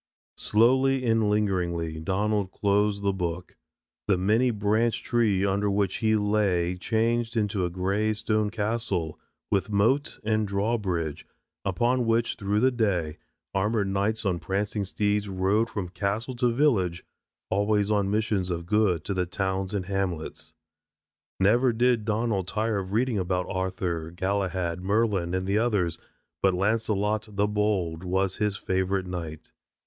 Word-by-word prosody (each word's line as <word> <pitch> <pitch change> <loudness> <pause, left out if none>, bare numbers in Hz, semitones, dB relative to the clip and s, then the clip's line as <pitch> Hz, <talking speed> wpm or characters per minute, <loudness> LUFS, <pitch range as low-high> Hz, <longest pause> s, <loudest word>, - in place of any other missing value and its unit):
Slowly 130 +4 +3
and 115 -2 +2
lingeringly 90 -6 0
Donald 100 +3 0
closed 100 +1 +1
the 100 -1 +2
book. 90 -2 -4 0.5
The 100 - +3
many 110 +7 +2
branched 110 +1 0
tree 105 -5 +2
under 100 +1 +1
which 100 -1 0
he 110 -1 +2
lay 100 -4 +1
changed 115 +4 0
into 100 -3 0
a - - -1
grey 100 +5 0
stone 110 -1 0
castle 105 -7 -2 0.3
with 100 +1 +1
moat 110 +8 +1
and 110 0 +1
drawbridge 100 -6 -1 0.4
upon 120 +5 +1
which 115 +1 +2
through 105 +1 0
the 130 +1 +4
day 95 -10 -1 0.3
armored 105 +1 +1
knights 105 +3 -1
on 90 -3 0
prancing 100 +4 -2
steeds 105 +1 0
rode 95 +5 +1
from 100 -4 -4
castle 100 +7 -2
to 125 -1 +2
village, 110 - +1 0.5
always 105 +1 +2
on 100 -2 +1
missions 105 -3 0
of 85 -1 -3
good 95 -4 +2
to 100 - -3
the 90 -2 -1
towns 95 0 -2
and 95 -3 -2
hamlets. 85 -4 -4 0.8
Never 120 +6 +4
did 120 -1 +2
Donald 105 -4 0
tire 110 0 0
of 95 -1 -6
reading 115 0 +1
about 90 0 -1
Arthur, 90 -3 -2
Galahad, 95 -1 -2
Merlin 100 -3 +1
and 95 0 -1
the 100 +2 +1
others, 105 -8 0 0.4
but 95 -2 +3
Launcelot, 110 +1 0
the 100 +1 +2
Bold, 100 -6 -1
was 95 +1 0
his 105 -2 0
favorite 95 0 -1
knight. 85 -4 -6
100 Hz, 145 wpm, -26 LUFS, 95-110 Hz, 0.8 s, the